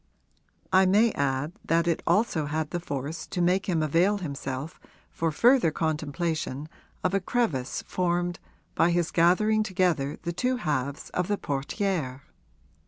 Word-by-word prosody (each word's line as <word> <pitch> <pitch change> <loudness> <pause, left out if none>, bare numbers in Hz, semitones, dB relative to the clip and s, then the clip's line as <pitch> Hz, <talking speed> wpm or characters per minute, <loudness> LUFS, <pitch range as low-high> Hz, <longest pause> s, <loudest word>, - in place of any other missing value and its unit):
I 190 0 +6
may 215 +5 +4
add 140 0 -1
that 165 +1 +1
it 170 - +1
also 190 -9 +2
had 155 +1 -2
the 175 - -1
force 155 0 -5
to - - -4
make 185 +3 +2
him 165 -3 +1
avail 175 +7 +3
himself 140 -3 -5 0.3
for 165 -1 -1
further 240 - +4
contemplation 155 -2 -2 0.4
of 185 - +1
a 195 - +3
crevice 180 - -1
formed 175 -1 -1 0.3
by 165 - +3
his 175 -1 +1
gathering 210 +6 +3
together 180 -8 0
the 170 - -2
two 255 +7 0
halves 140 - -2
of 180 -1 -1
the 205 0 0
portière. 140 -1 -2
170 Hz, 145 wpm, -27 LUFS, 150-185 Hz, 0.4 s, I